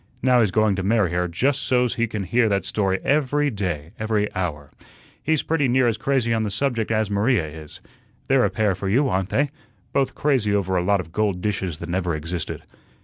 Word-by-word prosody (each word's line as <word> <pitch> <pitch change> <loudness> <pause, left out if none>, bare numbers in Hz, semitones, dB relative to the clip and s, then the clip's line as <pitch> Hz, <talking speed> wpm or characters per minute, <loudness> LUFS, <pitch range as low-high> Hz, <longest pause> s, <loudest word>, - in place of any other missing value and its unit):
Now 125 -1 +4
he's 110 -4 +3
going 110 +1 +2
to - - -1
marry 100 -2 +2
her 90 0 0
just 130 - 0
so's 125 -3 +1
he 115 0 0
can 105 -2 -4
hear 115 +5 +2
that 100 -1 0
story 95 -2 0
every 145 +1 +1
day, 85 -7 -3
every 110 -1 0
hour. 75 -6 -4 0.5
He's 155 -1 +1
pretty 150 -4 +1
near 125 0 +3
as 115 -3 0
crazy 130 -3 +1
on 115 - +1
the 110 - -1
subject 115 +1 -1
as 110 -2 0
Maria 105 -2 +2
is. 75 0 -11 0.5
They're 135 -2 +4
a - - +3
pair 105 -3 +1
for 95 +1 -4
you, 135 +7 +3
aren't 95 -2 -1
they? 145 0 +1 0.4
Both 135 -1 +1
crazy 130 -9 +1
over 95 -2 0
a 90 - +2
lot 100 +1 +2
of 80 -2 -12
gold 105 -1 0
dishes 95 -5 -2
that - - -7
never 90 -2 -1
existed. 85 +2 -5
105 Hz, 210 wpm, -23 LUFS, 95-125 Hz, 0.5 s, Now